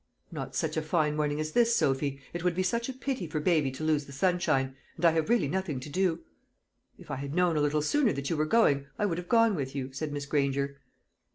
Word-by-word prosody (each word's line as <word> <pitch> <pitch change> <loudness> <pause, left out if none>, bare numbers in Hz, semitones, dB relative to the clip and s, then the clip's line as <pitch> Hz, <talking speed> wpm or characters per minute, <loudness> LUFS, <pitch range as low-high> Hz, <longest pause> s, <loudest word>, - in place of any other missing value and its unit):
"Not 135 -5 -6
such 160 +1 -1
a - - +2
fine 155 -1 +1
morning 150 -1 0
as 155 0 -2
this, 235 +2 +3
Sophy. 135 -2 0
It 175 0 -4
would 180 -2 +1
be 185 - +1
such 235 +6 -1
a - - -3
pity 260 -7 -3
for 155 0 -2
baby 155 -3 +2
to 130 +4 -7
lose 155 -2 +1
the - - -10
sunshine; 135 -4 +1 0.2
and 170 - -1
I 165 - +7
have 160 +3 0
really 230 -11 +3
nothing 160 -3 -2
to 130 - -8
do." 175 +1 0 0.8
"If - - -11
I 135 - -2
had 140 +2 -5
known 180 -2 +3
a 150 - +2
little 150 +1 +1
sooner 275 - +2
that 140 0 -4
you 165 - 0
were 155 0 0
going, 145 -10 +3
I 210 - +1
would 175 -4 -1
have 180 - -9
gone 230 -2 +5
with 140 -5 -3
you," 135 -1 -4
said 150 +2 -4
Miss 145 -1 -4
Granger. 140 -1 0
155 Hz, 250 wpm, -29 LUFS, 140-180 Hz, 0.8 s, I